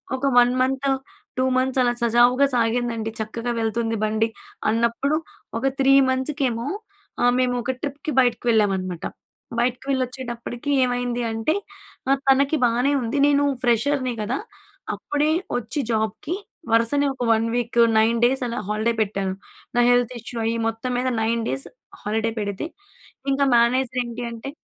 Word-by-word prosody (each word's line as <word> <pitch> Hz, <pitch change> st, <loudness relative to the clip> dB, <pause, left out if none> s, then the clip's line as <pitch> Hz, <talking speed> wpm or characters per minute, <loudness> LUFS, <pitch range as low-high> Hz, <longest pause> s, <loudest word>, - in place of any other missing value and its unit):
ఒక 265 Hz, -, -3 dB
1 245 Hz, 0 st, +5 dB
month, 265 Hz, +1 st, 0 dB, 0.5 s
2 255 Hz, -, +2 dB
months 260 Hz, 0 st, +1 dB
అలా 245 Hz, 0 st, +2 dB
సజావుగా 245 Hz, +4 st, +4 dB
సాగిందండి. 230 Hz, -1 st, 0 dB
చక్కగా 230 Hz, +2 st, -3 dB
వెళ్తుంది 225 Hz, 0 st, -1 dB
బండి 220 Hz, +1 st, +1 dB, 0.4 s
అన్నప్పుడు 235 Hz, +6 st, +1 dB, 0.4 s
ఒక 270 Hz, -, 0 dB
3 270 Hz, +1 st, +5 dB, 0.2 s
మంత్స్‌కేమో 260 Hz, -3 st, -1 dB, 0.6 s
ఆహ్, 245 Hz, 0 st, +5 dB
మేము 250 Hz, -1 st, +1 dB
ఒక 260 Hz, -, 0 dB
ట్రిప్‌కి 290 Hz, +2 st, -4 dB
బయటికి 245 Hz, -1 st, 0 dB
వెళ్ళామనమాట. 190 Hz, -5 st, 0 dB, 0.5 s
బయటికి 245 Hz, +2 st, 0 dB
వెళ్ళి 265 Hz, -2 st, +2 dB
వచ్చేటప్పటికి 245 Hz, +1 st, -6 dB
ఏమైంది 245 Hz, -1 st, -1 dB
అంటే, 225 Hz, +8 st, 0 dB, 0.5 s
నా 270 Hz, -, +5 dB, 0.2 s
తనకి 280 Hz, +3 st, +4 dB
బానే 245 Hz, +4 st, +2 dB
ఉంది. 235 Hz, +4 st, -2 dB
నేను 285 Hz, 0 st, +3 dB, 0.2 s
ఫ్రెషర్‍ని 250 Hz, +2 st, +1 dB
కదా! 235 Hz, +6 st, -1 dB, 0.6 s
అప్పుడే 295 Hz, +1 st, 0 dB, 0.3 s
వచ్చి 245 Hz, +4 st, -4 dB
జాబ్‍కి 220 Hz, -, -1 dB, 0.4 s
వరుసనే 230 Hz, +6 st, +3 dB
ఒక 255 Hz, -2 st, -5 dB
1 225 Hz, 0 st, +2 dB
వీకు, 240 Hz, 0 st, +1 dB, 0.2 s
9 225 Hz, +2 st, +3 dB
డేస్ 265 Hz, +2 st, +1 dB
అలా 235 Hz, +2 st, -3 dB
హాలిడే 215 Hz, +3 st, 0 dB
పెట్టాను. 195 Hz, -2 st, -1 dB, 0.4 s
నా -, -, +6 dB
హెల్త్ 245 Hz, 0 st, +2 dB
ఇష్యూ 235 Hz, +1 st, -8 dB
అయ్యి 230 Hz, +1 st, 0 dB
మొత్తం 225 Hz, +3 st, -3 dB
మీద 250 Hz, +1 st, 0 dB
9 230 Hz, +1 st, 0 dB
డేస్ 270 Hz, -, -1 dB, 0.4 s
హాలిడే 220 Hz, +2 st, 0 dB
పెడితే, 205 Hz, +7 st, -3 dB, 0.6 s
ఇంకా 275 Hz, +1 st, +2 dB
మేనేజర్ 250 Hz, +1 st, +2 dB
ఏంటి 235 Hz, +1 st, -6 dB
అంటే 230 Hz, +4 st, -7 dB
240 Hz, 145 wpm, -23 LUFS, 225-260 Hz, 0.6 s, నా